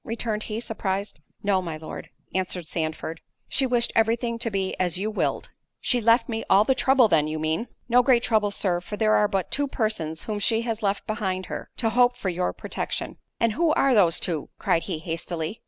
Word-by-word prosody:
returned 225 -2 -3
he, 215 0 -3
surprised. 200 -3 -3 0.2
"No, 200 -2 +2
my 165 -3 -5
Lord," 155 0 -8 0.2
answered 185 -2 -2
Sandford, 160 0 -3 0.3
"she 265 -1 +1
wished 240 -1 +1
every 225 +1 +4
thing 235 -1 -3
to 230 0 0
be 195 -2 -1
as 180 -1 +1
you 210 +3 -2
willed." 215 - -1 0.3
"She 245 -2 +1
left 230 +2 +4
me 225 -2 -3
all 195 +2 +6
the 265 - +3
trouble, 260 -2 +4
then, 160 -6 +3
you 155 +1 -3
mean?" 160 +9 -1 0.2
"No 245 +1 +5
great 245 -1 +3
trouble, 215 -3 +2
Sir; 180 -3 -1
for 210 +3 -6
there 215 0 +3
are 210 - +4
but 195 -3 -2
two 285 0 +1
persons 215 - -2
whom 210 -2 -3
she 225 +2 +2
has 230 -2 -3
left 200 -1 0
behind 190 -4 -2
her, - - -6
to 225 -2 0
hope 245 +1 +4
for 190 - -2
your 180 0 -1
protection." - - -4 0.2
"And 230 -2 +2
who 330 +4 +2
are 275 -3 +3
those 180 -7 +4
two?" 160 -5 -2
cried 165 - +1
he 175 - -1
hastily. 165 +3 -4
210 Hz, 210 wpm, -25 LUFS, 180-230 Hz, 0.3 s, all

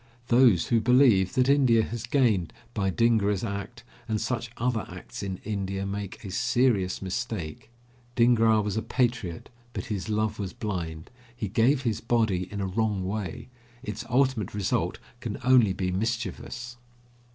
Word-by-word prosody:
Those 120 -7 +5
who 115 -2 +3
believe 120 -6 +4
that 125 0 +3
India 130 -5 +4
has 115 0 -5
gained 115 - +2 0.2
by 100 -4 0
Dhingra's 105 -1 +2
act 105 +2 -5 0.2
and 110 -2 0
such 120 +1 -2
other 115 -3 0
acts - - -8
in 95 -2 -4
India 100 -2 -3
make 100 +1 -5
a 95 - -6
serious 120 -4 +1
mistake. 95 -4 -4 0.5
Dhingra 115 -3 +4
was 105 -1 -2
a 110 - 0
patriot, 120 -10 -1 0.2
but - - -4
his 100 +1 -4
love 110 0 0
was 95 -2 -4
blind. 85 -7 -5 0.2
He 115 -3 -3
gave 125 +6 +2
his 115 -4 -1
body 110 -6 0
in 100 -1 -4
a - - 0
wrong 100 0 -1
way; 110 +4 -4 0.3
its 110 -2 -5
ultimate 130 -6 +1
result 100 -3 0 0.2
can 115 -3 -4
only 125 -5 +5
be 95 -1 -2
mischievous. 115 +4 -3
110 Hz, 150 wpm, -27 LUFS, 95-120 Hz, 0.5 s, Those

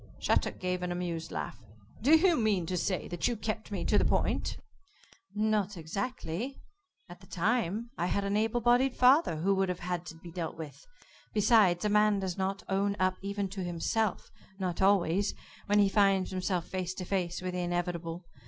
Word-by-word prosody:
Shattuck - - +1
gave 180 0 -2
an 180 0 -2
amused 175 -2 -3
laugh. 120 - -5 0.4
"Do 295 +8 +6
you 350 +1 +4
mean 215 - +1
to 180 - -2
say 180 +1 -1
that 175 -1 -1
you 240 - 0
kept 215 +1 -4
me 190 -4 -3
to 210 - +3
the - - +2
point?" - - 0 0.8
"Not 210 -2 0
exactly. 200 - -4 0.5
At 175 0 -12
that 190 - -17
time 220 +3 0
I 175 - +1
had 200 +3 0
an 200 +1 0
able 225 +3 +1
bodied 245 +3 +3
father 260 - +5
who 180 +6 +1
would 190 -1 +1
have 180 -1 -3
had 175 -1 -3
to 160 - -8
be 170 +1 -11
dealt 165 -2 -4
with. 160 - -9 0.5
Besides, 210 -4 +4
a - - +2
man 210 0 +4
does 190 -2 -2
not 195 0 -2
own 200 +1 +1
up 185 0 +1
even 200 0 -2
to 190 0 -5
himself 180 +4 -1 0.3
not 185 -3 -2
always 195 0 +3 0.3
when 205 0 +3
he 205 -1 +5
finds 195 -2 +3
himself 185 -2 -1
face 185 -1 -3
to 185 - -5
face 175 -2 -1
with 185 0 -4
the 180 - -2
inevitable. 175 -1 -3
190 Hz, 190 wpm, -30 LUFS, 175-210 Hz, 0.8 s, Do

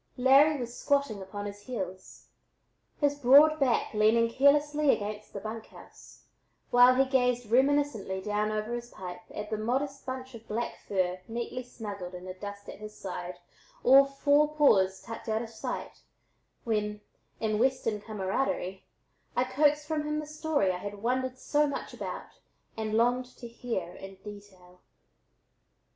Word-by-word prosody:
Larry 275 +4 +5
was 240 -1 -5
squatting 280 -8 0
upon 205 +2 -6
his 205 0 -7
heels, 190 -5 -7 0.7
his 290 -1 +3
broad 290 +4 +7
back 260 -4 +1
leaning 225 +2 +3
carelessly 295 +3 +3
against 210 -2 -1
the 200 - -6
"bunk 220 +2 -6
house," - - -16 0.5
while 245 +1 +7
he 270 +1 +4
gazed 250 -3 +1
reminiscently 265 -7 +2
down 210 +2 -1
over 215 +2 -2
his 240 0 -5
pipe 180 -4 -8
at 210 +1 -7
the 215 - -1
modest 270 +5 -2
bunch 260 0 -6
of 230 -1 -12
black 230 +3 -3
fur 185 -2 0
neatly 235 +2 -4
snuggled 205 -7 -7
in 180 0 -9
the 185 - -6
dust 200 +1 -8
at - - -9
his 215 0 -9
side, 180 -1 -6 0.5
all 270 +2 +8
four 290 +2 +2
paws 190 -11 +4
tucked 230 0 -7
out 220 +1 0
of 230 - -9
sight, 225 - -6 0.6
when, 210 -2 -1 0.4
in 215 -1 0
Western 230 -4 +1
cameraderie, 195 -2 -2 0.5
I 250 - +3
coaxed 295 +3 +2
from 310 -1 -1
him 300 0 -1
the 305 - -3
story 305 - 0
I 180 - -3
had 205 +1 -7
wondered 255 +1 0
so 295 +3 +1
much 280 - -5
about - - -7 0.4
and 220 -1 -2
longed 245 +2 +1
to 240 - -8
hear 230 -7 -4
in 195 0 -10
detail. 195 -4 -13
230 Hz, 155 wpm, -29 LUFS, 205-270 Hz, 0.7 s, all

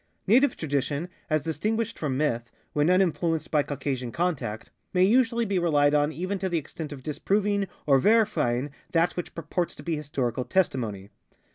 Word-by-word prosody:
Native 260 +8 +4
tradition, 145 +2 -1 0.2
as 155 -2 +1
distinguished 210 +9 -2
from 140 -4 -1
myth, 120 -5 0 0.2
when 150 +1 +2
uninflu 180 -2 +3
enced - - -13
by 150 - +4
Caucasian 135 -4 -3
contact, 140 -11 -2 0.2
may 180 - +5
usually 235 +2 +3
be 195 -3 0
relied 145 -4 +3
on 145 0 +3
even 185 +5 -3
to 190 0 -1
the 175 - 0
extent 155 0 -6
of 135 -3 -8
disproving 200 +6 0 0.2
or 135 -2 +5
verifying 145 - +2 0.2
that 165 +1 +2
which 175 - -5
purports 165 +2 -2
to - - -11
be 170 -2 -1
historical 135 -5 -2
testimony. 115 - -1
155 Hz, 165 wpm, -26 LUFS, 140-185 Hz, 0.2 s, may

